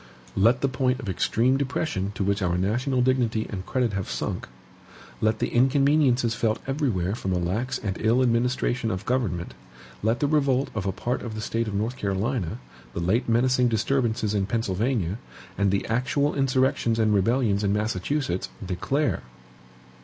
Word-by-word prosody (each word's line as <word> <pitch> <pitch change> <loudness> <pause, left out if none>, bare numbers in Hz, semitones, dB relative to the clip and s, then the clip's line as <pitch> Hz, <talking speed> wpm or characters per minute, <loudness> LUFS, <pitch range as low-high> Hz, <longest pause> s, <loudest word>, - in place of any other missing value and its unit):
Let 115 +6 +4
the 140 - +3
point 130 -1 0
of 115 - -5
extreme 120 +7 +2
depression 135 -8 -2
to - - -1
which 100 +1 0
our 90 -1 +1
national 125 +7 +1
dignity 120 -4 +1
and 95 -3 -5
credit 125 -4 0
have 100 -4 -3
sunk, 65 -2 -3 0.7
let 110 0 +2
the - - -1
inconveniences 135 -1 +3
felt 110 -1 0
everywhere 125 - 0
from 95 -4 -3
a - - +1
lax 105 +9 -1
and 95 -3 -3
ill 115 +4 +3
administration 120 0 +1
of 95 -1 -3
government, 105 -9 -1 0.5
let 115 +3 +1
the - - +1
revolt 140 -3 +2
of 100 -3 -3
a - - +1
part 120 +6 -2
of 110 -2 -6
the - - -4
State 115 +1 -1
of 105 - -3
North 110 +5 -1
Carolina, 100 - -1 0.4
the - - -2
late 95 +9 +1
menacing 125 +2 +3
disturbances 115 -1 0
in 100 -2 0
Pennsylvania, 110 -2 -1 0.4
and 100 -1 +2
the 100 0 0
actual 125 +5 +1
insurrections 130 -4 +1
and 110 -2 +3
rebellions 105 0 +2
in 100 - +2
Massachusetts, 105 +1 -1 0.2
declare 135 +11 -1
115 Hz, 165 wpm, -25 LUFS, 100-130 Hz, 0.7 s, Let